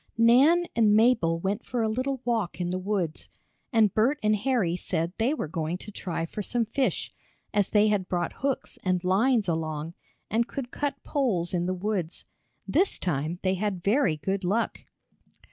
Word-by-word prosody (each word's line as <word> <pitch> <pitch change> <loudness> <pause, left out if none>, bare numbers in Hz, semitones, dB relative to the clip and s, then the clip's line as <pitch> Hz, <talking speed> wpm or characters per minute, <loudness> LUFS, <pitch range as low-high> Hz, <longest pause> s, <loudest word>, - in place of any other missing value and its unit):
Nan 270 +10 +5
and 215 -3 +4
Mabel 220 -8 +4
went 200 +5 -2
for 240 -2 -2
a - - +2
little 255 +4 -2
walk 225 -8 -1
in 175 0 -1
the 185 - -1
woods, 185 -5 -2 0.4
and 220 -5 +4
Bert 245 +7 +2
and 215 0 +3
Harry 210 -6 +1
said 170 -1 -2
they 230 +5 +2
were 305 - -2
going 160 +2 -3
to 210 - -10
try 175 -4 -3
for 210 - -5
some 235 +3 -1
fish, 260 +4 -1 0.4
as 205 -2 +2
they 210 0 +4
had 200 -3 0
brought 175 -2 -1
hooks 275 -1 -3
and 185 -1 0
lines 210 +4 +2
along, 160 -1 -2 0.3
and 230 +2 +1
could 250 -3 -6
cut 285 -2 -3
poles 205 - 0
in 175 0 0
the 185 - -1
woods. 185 -3 -3 0.4
This 385 - +2
time 160 0 -2
they 185 -1 +2
had 190 -2 -2
very 205 - +2
good 190 +5 -2
luck. 205 +6 0
205 Hz, 180 wpm, -27 LUFS, 175-235 Hz, 0.4 s, Nan